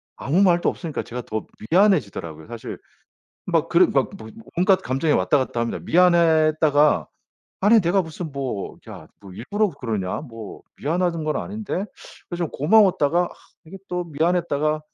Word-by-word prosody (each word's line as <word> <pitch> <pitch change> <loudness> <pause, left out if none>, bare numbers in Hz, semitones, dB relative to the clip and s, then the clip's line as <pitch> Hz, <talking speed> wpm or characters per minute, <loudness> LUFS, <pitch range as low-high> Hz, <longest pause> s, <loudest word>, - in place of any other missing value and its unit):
아무 160 +8 0
말도 175 -3 +4
없으니까 165 -5 -5
제가 125 +1 -6
더 110 -1 -4 0.2
미안해지더라고요, 125 - +1
사실. 115 -1 -8 0.7
막 - - 0
그런 - - +4
막 - - +2
뭐 110 - -10 0.3
온갖 185 +1 +3
감정이 135 +3 0
왔다 145 - +2
갔다 120 -3 -2
합니다. 115 - -2
미안했다가 155 - +4 0.5
'아니 215 +3 +5
내가 180 +3 +2
무슨 160 -2 -6
뭐 130 -7 -4
야 - - -10
뭐 95 -2 -12
일부러 205 - -1
그러냐? 115 - -4
뭐 115 -7 -10 0.2
미안하는 170 +1 -1
건 155 0 -1
아닌데?' 205 -2 -4 0.5
그래서 175 -1 -2
좀 - - -4
고마웠다가 175 -1 +3
아 - - -6 0.4
이게 185 +5 -10
또 180 0 -2
미안했다가 155 -1 0
155 Hz, 340 characters per minute, -22 LUFS, 130-180 Hz, 0.7 s, 아니